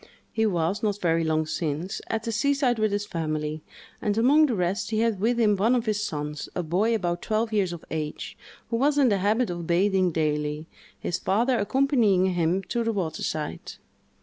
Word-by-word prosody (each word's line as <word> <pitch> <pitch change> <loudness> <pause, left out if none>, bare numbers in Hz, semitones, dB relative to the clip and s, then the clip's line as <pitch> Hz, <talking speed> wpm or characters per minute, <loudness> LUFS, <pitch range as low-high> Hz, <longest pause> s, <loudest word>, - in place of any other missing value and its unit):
He 220 0 +1
was, 180 +1 0
not 205 -2 0
very 165 -2 +1
long 155 0 +1
since, 160 +3 -3
at 220 -1 -2
the 230 - -2
seaside 255 +1 +1
with 215 -1 +2
his 205 0 -1
family, 155 -4 -3 0.4
and, 210 0 0
among 290 +7 +5
the 245 - -1
rest, 190 +3 -1
he 220 -1 0
had 225 -4 +1
with 235 +4 +1
him 210 -3 +4
one 220 +6 +2
of 240 -1 0
his 210 -2 0
sons, 150 -6 -4
a 180 - -1
boy 195 +8 +1
about 175 -4 -2
twelve 220 +1 -1
years 195 -4 +1
of 170 -2 -8
age, 155 -1 -4 0.4
who 230 - +1
was 285 +4 +2
in 275 -4 +5
the 200 -2 +1
habit 215 +3 +1
of 170 -1 -5
bathing 185 +1 +2
daily, 150 -1 -1 0.3
his 180 - -2
father 235 +7 +1
accompanying 210 -6 +2
him 175 +2 +1
to 235 +3 -2
the 230 - 0
water 180 -7 -3
side. 150 - -4
200 Hz, 200 wpm, -26 LUFS, 165-225 Hz, 0.4 s, among